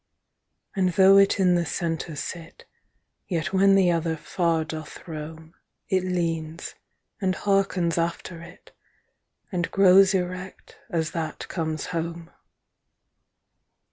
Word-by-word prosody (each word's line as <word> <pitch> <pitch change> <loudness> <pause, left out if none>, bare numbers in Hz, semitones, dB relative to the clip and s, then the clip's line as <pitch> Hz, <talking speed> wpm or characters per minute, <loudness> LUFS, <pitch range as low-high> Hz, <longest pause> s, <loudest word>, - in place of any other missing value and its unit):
And 185 -2 +1
though 195 +2 +7
it 195 0 +3
in 180 -2 +4
the 175 -1 +2
center 165 0 -3
sit, 165 +3 -7 0.6
Yet 175 0 -2
when 195 +1 +5
the 185 -2 +4
other 165 -1 -1
far 165 0 0
doth 155 +2 -8
rome, 160 0 -8 0.4
30 - - +3
It 185 - +2
leanes, 165 -2 -3 0.5
and 185 -1 +1
hearkens 195 -4 +1
after 170 0 -3
it, 170 +1 -14 0.8
And 175 -3 -1
growes 195 0 +6
erect, 185 +1 -5
as 165 -1 -1
that 160 -2 -4
comes 160 -3 -3
home. 165 0 -4
170 Hz, 120 wpm, -25 LUFS, 165-185 Hz, 0.8 s, though